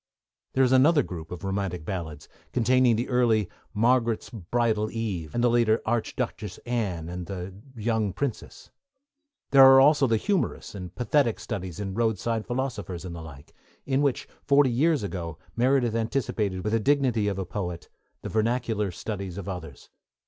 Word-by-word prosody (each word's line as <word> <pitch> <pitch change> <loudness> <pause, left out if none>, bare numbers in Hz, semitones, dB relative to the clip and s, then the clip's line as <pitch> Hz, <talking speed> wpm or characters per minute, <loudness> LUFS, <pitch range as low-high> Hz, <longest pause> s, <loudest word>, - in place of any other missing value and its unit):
There 135 - +3
is 130 - +3
another 145 +3 +5
group 80 -6 -8
of 90 +2 -7
romantic 95 -4 -3
ballads, 80 -5 -5 0.3
containing 125 0 +4
the 120 +3 -2
early 115 -5 +2 0.2
Margaret's 115 +1 +1
Bridal 110 +1 0
Eve, 100 -10 -4
and 120 - +1
the - - +5
later 115 -2 +3
Arch 115 0 -1
duchess 110 -7 -4
Anne 100 -9 -2
and 90 0 -6
The 95 -1 -6 0.2
Young 110 -2 0
Princess. 125 +5 -5 0.8
There 135 -1 +8
are 135 0 +9
also 140 0 +5
the 115 -2 +2
humorous 200 - -1
and 90 -3 -8
pathetic 125 -1 +1
studies 95 -7 -5
in 100 -2 -4
Roadside 110 0 -1
Philosophers 105 -9 -3
and 85 -2 -6
the 85 - -7
like, 75 -3 -12 0.3
in 135 0 +1
which, 140 -3 0 0.2
forty 140 -2 +4
years 145 +1 +2
ago, 85 -5 -5 0.2
Meredith 125 -1 +2
anticipated, 110 -5 -1
with 105 +1 -1
the 115 - +3
dignity 125 -4 +2
of 100 -2 -1
a 95 - -3
poet, 90 -3 -5 0.4
the - - -4
vernacular 110 -2 0
studies 95 0 -5
of 100 -1 -6
others. 80 -8 -8
110 Hz, 165 wpm, -26 LUFS, 95-125 Hz, 0.8 s, are